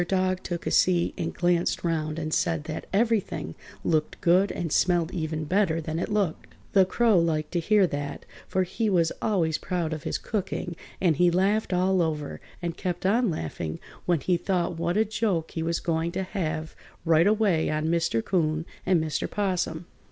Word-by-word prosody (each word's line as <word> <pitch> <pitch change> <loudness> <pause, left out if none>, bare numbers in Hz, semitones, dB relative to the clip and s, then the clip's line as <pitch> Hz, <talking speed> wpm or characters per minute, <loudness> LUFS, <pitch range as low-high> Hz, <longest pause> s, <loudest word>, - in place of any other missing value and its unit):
Dog 185 0 +1
took 170 -1 -5
a - - -1
seat 175 -2 +3
and - - -3
glanced 175 -1 +1
round 155 -2 -1
and 155 -1 -3
said 165 -4 +1
that 155 0 -6
everything 205 - 0 0.3
looked 155 -2 0
good 185 +3 +4
and 165 -3 -3
smelled 175 0 +2
even 160 -3 -2
better 175 0 +1
than 160 0 -3
it - - -2
looked. 200 -6 -1 0.2
The 195 -2 +6
Crow 225 -2 +3
liked 155 -2 0
to 175 - 0
hear 205 +3 +4
that, 145 -4 -4 0.2
for 185 - +1
he 215 +5 -1
was 170 -4 +3
always 170 -7 +1
proud 170 -4 -2
of 155 - -5
his - - -2
cooking 185 -4 -3 0.2
and 170 -6 +2
he 175 0 +5
laughed 195 +5 +1
all 185 +1 +2
over, 155 -3 -2 0.2
and 170 -1 -2
kept 180 -1 -3
on 230 +4 +3
laughing 80 - -4 0.3
when 175 -5 +2
he 180 +5 +2
thought 175 -1 -1
what 170 +3 0
a 220 - +4
joke 200 -6 -1
he 165 - -3
was 165 +1 0
going 165 0 -1
to 190 +1 -1
have 160 -5 -3 0.3
right 165 +2 +5
away 205 -6 +2
on 155 0 -1
Mr. 165 -8 +1
'Coon 160 -3 0 0.2
and 180 -2 +4
Mr. 155 -1 -2
'Possum. 180 -4 -1
175 Hz, 185 wpm, -26 LUFS, 160-190 Hz, 0.3 s, The